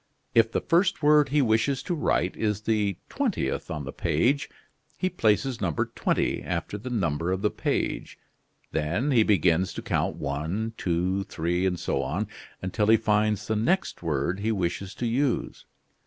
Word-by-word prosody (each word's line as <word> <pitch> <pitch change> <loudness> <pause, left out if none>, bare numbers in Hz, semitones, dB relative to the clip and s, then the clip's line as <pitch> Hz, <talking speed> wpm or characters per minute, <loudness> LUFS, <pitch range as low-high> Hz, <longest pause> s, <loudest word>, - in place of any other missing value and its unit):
If 115 -1 +4
the - - 0
first 175 -2 +2
word 150 -1 +5
he 145 0 +3
wishes 120 +4 +1
to 180 - -2
write 95 - 0
is 105 -2 -1
the 105 -4 0
twentieth 240 - -2
on 75 -1 -4
the 70 - -6
page, 140 +4 +1 0.5
he 185 - -1
places 115 +3 +1
number 85 -6 -1
20 - - 0
after 90 +4 -3
the 125 +5 -6
number 85 -7 0
of 95 +2 -2
the 105 - +2
page; - - -2 0.5
then 85 - 0
he 120 -4 +5
begins 95 -4 +3
to - - -6
count - - 0
one, 80 +11 -3
two, 90 +1 0
three, 90 +3 -1
and 90 -2 -1
so - - -1
on, - - -2 0.4
until 105 +3 0
he 110 +1 +7
finds 105 -1 +1
the 110 - -1
next 130 - 0
word 80 +2 -1
he 110 +2 0
wishes 95 0 -2
to 125 - -3
use. 125 +2 -1
105 Hz, 170 wpm, -26 LUFS, 90-120 Hz, 0.5 s, he